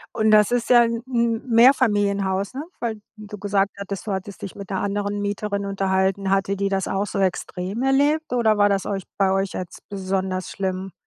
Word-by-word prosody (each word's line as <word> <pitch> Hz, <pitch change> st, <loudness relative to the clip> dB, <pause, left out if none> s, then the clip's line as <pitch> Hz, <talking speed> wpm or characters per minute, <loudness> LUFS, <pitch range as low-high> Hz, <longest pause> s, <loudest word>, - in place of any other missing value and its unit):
Und 220 Hz, -1 st, +2 dB
das 210 Hz, 0 st, +5 dB
ist 245 Hz, -1 st, 0 dB
ja 240 Hz, -1 st, +7 dB
'n 230 Hz, 0 st, -1 dB
M 235 Hz, -2 st, 0 dB
Mehrfamilienhaus, 205 Hz, -5 st, +3 dB
ne? 275 Hz, +3 st, -4 dB, 0.2 s
Weil 220 Hz, -3 st, -3 dB, 0.2 s
du 210 Hz, 0 st, -9 dB
gesagt 200 Hz, 0 st, +1 dB
hattest, 200 Hz, -1 st, -5 dB
du 210 Hz, -, -3 dB
hattest 190 Hz, +1 st, -5 dB
dich 195 Hz, -, -6 dB
mit 200 Hz, -2 st, -9 dB
der 195 Hz, -, -2 dB
anderen 205 Hz, +1 st, -2 dB
Mieterin 205 Hz, 0 st, -2 dB
unterhalten. 195 Hz, 0 st, 0 dB
Hatte 195 Hz, 0 st, +1 dB
die 200 Hz, 0 st, -1 dB
das 195 Hz, -1 st, -1 dB
auch 200 Hz, +1 st, -1 dB
so 200 Hz, -, -4 dB
extrem 190 Hz, +2 st, -2 dB
erlebt, 285 Hz, +3 st, +2 dB
oder 225 Hz, -4 st, +2 dB
war 205 Hz, -, +5 dB
das 195 Hz, -1 st, 0 dB
euch 195 Hz, -1 st, -3 dB
bei 195 Hz, -1 st, +3 dB
euch 195 Hz, 0 st, 0 dB
jetzt 180 Hz, -2 st, -6 dB
besonders 190 Hz, -1 st, -2 dB
schlimm? 190 Hz, 0 st, -3 dB
200 Hz, 195 wpm, -23 LUFS, 195-220 Hz, 0.2 s, ja